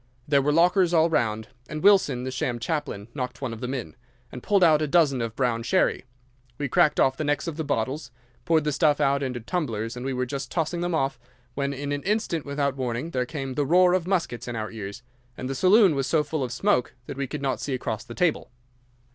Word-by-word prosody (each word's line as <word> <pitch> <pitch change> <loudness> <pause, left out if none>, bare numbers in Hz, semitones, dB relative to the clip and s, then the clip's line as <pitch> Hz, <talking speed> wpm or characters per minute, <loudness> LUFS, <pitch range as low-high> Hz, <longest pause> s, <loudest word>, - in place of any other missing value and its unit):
There 140 -1 +4
were 145 +2 +1
lockers 175 +2 +3
all 165 +1 +4
round, 110 -6 0 0.2
and 155 +2 -5
Wilson, 190 -11 +4
the 130 - -3
sham 125 -2 -2
chaplain, 135 -6 -3
knocked 125 -3 -4
one 130 -4 -4
of 110 - -9
them 125 +2 -3
in, 125 -1 -6 0.4
and 125 - -8
pulled 200 +4 +3
out 155 -3 +5
a 155 - 0
dozen 140 -5 +3
of 115 -1 -4
brown 120 -3 0
sherry. 130 +2 +1 0.5
We 145 -2 -3
cracked 150 - +3
off 135 0 +3
the - - -2
necks 145 0 0
of 165 -3 -4
the 160 - -3
bottles, 135 0 -2 0.3
poured 165 -3 +2
the 150 - 0
stuff 150 0 +2
out 140 -1 +2
into 130 -3 -3
tumblers, 115 - -3
and 125 - -6
were 130 -1 -1
just 135 -1 -5
tossing 170 +1 -2
them 175 -1 -1
off, 135 -3 -1 0.3
when 140 +1 -1
in 140 +1 -4
an 145 0 -2
instant 195 -6 -1
without 140 -1 -1
warning 130 +4 -3
there 125 -3 -1
came 135 -3 -5
the 145 - 0
roar 180 +5 +4
of 180 -2 0
muskets 165 - -1
in 120 - -4
our 110 -1 -4
ears, 105 +1 -7 0.3
and 130 - -4
the 135 - -2
saloon 190 - +5
was 135 -1 -1
so 155 -2 +2
full 150 -1 -3
of 125 - -4
smoke 135 -2 +1
that 140 - -7
we 140 0 -3
could 145 +2 -6
not 135 -1 -1
see 140 - -2
across 115 -2 -4
the 120 -1 -10
table. 175 -3 0
140 Hz, 230 wpm, -25 LUFS, 125-160 Hz, 0.5 s, out